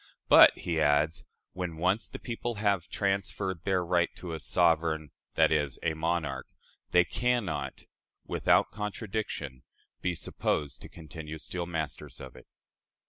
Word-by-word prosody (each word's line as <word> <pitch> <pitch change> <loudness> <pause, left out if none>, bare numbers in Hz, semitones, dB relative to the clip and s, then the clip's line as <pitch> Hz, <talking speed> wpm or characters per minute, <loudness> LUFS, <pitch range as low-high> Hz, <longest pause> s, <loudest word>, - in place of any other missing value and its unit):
"But," - - +9
he 80 -2 -1
adds, 75 +2 +2 0.3
"when 90 -2 -4
once 95 +6 +1
the - - -7
people 120 0 -4
have 100 -5 +1
transferred 95 -2 -1
their 95 -3 +1
right 85 -1 +2
to 85 -2 -6
a 80 - -4
sovereign 80 -1 +2 0.3
[i.e., 75 -2 +4 0.2
a 80 - +1
monarch], 80 -5 -1 0.4
they 90 0 +5
can 120 +6 +1
not, 85 - -4 0.4
without - - +3
contradiction, 105 - -4 0.4
be 90 -1 0
supposed 75 -2 -2
to - - -10
continue 80 -1 -8
still 85 +3 -4
masters 80 -3 -4
of - - -9
it." - - -15
85 Hz, 140 wpm, -29 LUFS, 80-95 Hz, 0.4 s, But